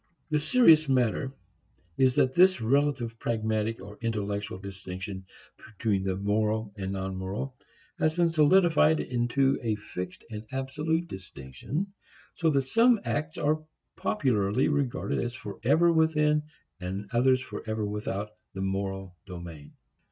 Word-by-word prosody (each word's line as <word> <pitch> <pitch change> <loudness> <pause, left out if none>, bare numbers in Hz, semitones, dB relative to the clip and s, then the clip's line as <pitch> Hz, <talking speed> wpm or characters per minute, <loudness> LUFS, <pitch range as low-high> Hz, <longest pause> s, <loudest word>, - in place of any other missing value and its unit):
The 150 - +3
serious 155 - +5
matter 130 +1 +1 0.6
is 130 -1 +3
that 130 -3 +3
this 185 +1 +5
relative 120 -1 +1
pragmatic, 110 -1 -1
or 105 +1 -11
intellectual, 105 -3 -2
distinction 95 0 -7 0.5
between 105 -5 +1
the 95 -1 -1
moral 105 +1 0
and 95 -2 -4
non 95 0 -3
moral, 100 +8 -4 0.4
has 155 0 +2
been 170 -1 +3
solidified 160 0 +5
into 130 +3 +1
a 110 -2 0
fixed 90 -3 -7
and 105 0 -5
absolute 150 +6 -1
distinction, 95 - -6 0.4
so 165 - +1
that 140 -3 +2
some 230 - +4
acts 155 +1 -2
are 155 +1 +1 0.3
popularly 125 - +1
regarded 145 -4 -1
as 120 +1 -3
forever 130 +8 +2
within 150 -2 +3 0.3
and 95 +2 -5
others 130 +2 +4
forever 110 -4 -4
without 105 0 -3 0.2
the 95 - -3
moral 95 -1 -3
domain. 85 -5 -9
115 Hz, 130 wpm, -28 LUFS, 100-150 Hz, 0.6 s, serious